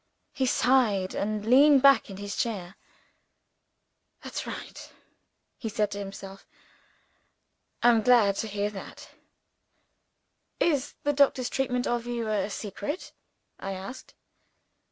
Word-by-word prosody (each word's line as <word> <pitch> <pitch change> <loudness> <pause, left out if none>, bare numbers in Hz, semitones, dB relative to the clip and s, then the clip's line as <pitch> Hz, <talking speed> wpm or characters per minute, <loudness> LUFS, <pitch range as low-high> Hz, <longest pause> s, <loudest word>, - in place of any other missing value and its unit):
He 260 -1 0
sighed, 230 -8 +2
and 210 0 -2
leaned 275 +3 +6
back 275 -4 +6
in 195 - -8
his 205 0 -5
chair. 195 -5 -3 1.5
"That's - - -5
right!" - - -8 0.7
he 225 - -4
said 210 -1 -1
to 200 - -5
himself. 195 -1 -9 1.4
"I'm 235 -2 +5
glad 215 -4 +4
to 220 - -2
hear 205 0 -2
that." 195 - -10 1.5
"Is 290 -4 +1
the 290 - +1
doctor's 270 -3 +2
treatment 250 -2 -1
of 240 0 -1
you 235 -2 -3
a 210 -2 0
secret?" 210 - -5 0.5
I 195 - -4
asked. 195 +7 -9
220 Hz, 115 wpm, -27 LUFS, 200-255 Hz, 1.5 s, leaned